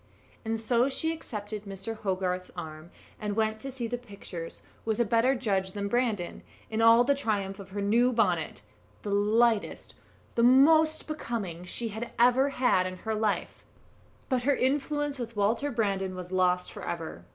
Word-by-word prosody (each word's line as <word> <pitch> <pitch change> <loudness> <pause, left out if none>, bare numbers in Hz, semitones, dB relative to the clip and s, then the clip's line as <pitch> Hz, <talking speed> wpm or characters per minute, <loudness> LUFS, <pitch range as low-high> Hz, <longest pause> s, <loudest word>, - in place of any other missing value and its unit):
And 225 0 -2
so 240 +3 +2
she 320 +4 -1
accepted 210 -8 -6
Mr. 195 +3 -5
Hogarth's 185 -3 -2
arm, 155 -1 -7 0.3
and 210 -2 -3
went 220 0 0
to 270 +4 -6
see 250 -2 -4
the 240 +1 -3
pictures 200 -7 -8 0.2
with 220 0 -1
a 235 - +4
better 230 +5 +3
judge 195 -6 -1
than 200 -1 -2
Brandon, 220 -5 -1 0.3
in 220 +1 0
all 230 +1 +7
the 280 +3 +3
triumph 205 -7 -2
of 195 -1 -10
her 200 +1 -4
new 235 +5 +3
bonnet 230 -2 0 0.4
the 205 - -3
lightest, 215 +2 +2 0.4
the 235 - +1
most 310 +6 +5
becoming 220 - -4
she 230 +5 -3
had 220 +3 -6
ever 250 +3 +5
had 245 -9 +2
in 185 0 -6
her 220 - 0
life: 215 -1 -1 0.6
but 255 -2 +1
her 280 +3 +2
influence 290 +2 0
with 235 -1 -5
Walter 220 +7 +1
Brandon 195 -6 -1
was 180 0 -7
lost 180 -1 +1
for - - -9
ever. 160 - -5
220 Hz, 170 wpm, -28 LUFS, 195-245 Hz, 0.6 s, all